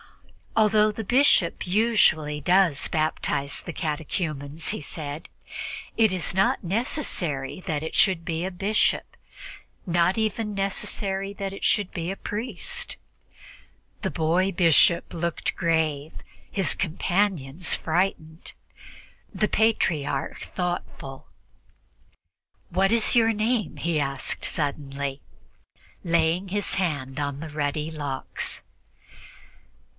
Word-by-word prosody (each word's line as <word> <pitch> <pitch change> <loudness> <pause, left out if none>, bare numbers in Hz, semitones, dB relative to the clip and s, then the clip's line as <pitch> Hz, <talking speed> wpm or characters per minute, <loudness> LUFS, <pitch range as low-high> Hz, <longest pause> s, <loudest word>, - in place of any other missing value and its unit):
"Although 215 -1 +5
the 220 +2 -5
bishop 245 -8 +3
usually 180 -7 +3
does 175 -2 +3
baptize 155 -2 0
the - - -6
catechumens," 155 -1 -3
he - - -2
said, 145 0 -6 0.7
"it 220 -3 +4
is 185 -4 0
not 190 +1 +2
necessary 180 - -1
that 155 -5 -2
it 160 - -5
should 180 -5 +3
be 165 0 -2
a 190 - -2
bishop, 200 +4 +1 0.7
not 175 +1 +2
even 220 -1 -1
necessary 195 0 -2
that 195 -1 -4
it 195 - -9
should 205 -3 +2
be 170 +1 -3
a 195 - -5
priest." 210 -2 -3 1.0
The - - -1
boy 175 +4 +2
bishop 170 -1 +4
looked 170 0 -2
grave, 160 -4 0 0.4
his 195 -2 +2
companions 175 -3 0
frightened, 160 -1 -1 0.8
the 210 - +1
Patriarch 165 -12 +1
thoughtful. 175 -6 -4 1.4
"What 190 +3 +2
is 230 0 +3
your 225 -1 +5
name?" 215 -2 0
he 165 -2 0
asked 140 -1 -1
suddenly, 140 -2 -2 0.8
laying 170 +2 +2
his 205 +1 0
hand 145 -7 -1
on 145 -1 -2
the 160 0 -7
ruddy 150 +1 -2
locks. 145 -4 -2
170 Hz, 110 wpm, -25 LUFS, 150-195 Hz, 1.4 s, Although